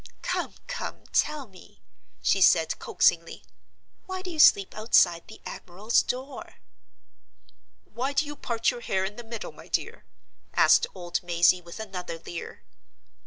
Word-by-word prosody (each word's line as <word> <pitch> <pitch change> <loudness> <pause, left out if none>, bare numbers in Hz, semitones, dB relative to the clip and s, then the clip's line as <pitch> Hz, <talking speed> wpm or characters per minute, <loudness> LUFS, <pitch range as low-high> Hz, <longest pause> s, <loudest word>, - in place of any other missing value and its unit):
"Come! - - -2
come! - - -6
tell 300 -3 +1
me," 190 -5 -18 0.4
she - - +2
said, - - +4
coaxingly. - - +1 0.6
"Why 375 0 -5
do 365 - -5
you 320 - -7
sleep 200 -9 +6
outside 180 -6 +3
the - - -13
admiral's 200 +6 0
door?" 260 +3 -6 1.3
"Why 260 +4 -4
do 285 +2 +2
you 295 0 -7
part 230 -4 0
your 245 -1 -8
hair 190 -4 -1
in 205 +2 -5
the 240 - -8
middle, 230 -1 -7
my - - -15
dear?" 470 - -3 0.5
asked 470 - +5
old 175 -1 -3
Mazey, 175 +1 +3
with 170 +4 -11
another 185 -6 -6
leer. 165 +1 -8
220 Hz, 145 wpm, -27 LUFS, 180-280 Hz, 1.3 s, sleep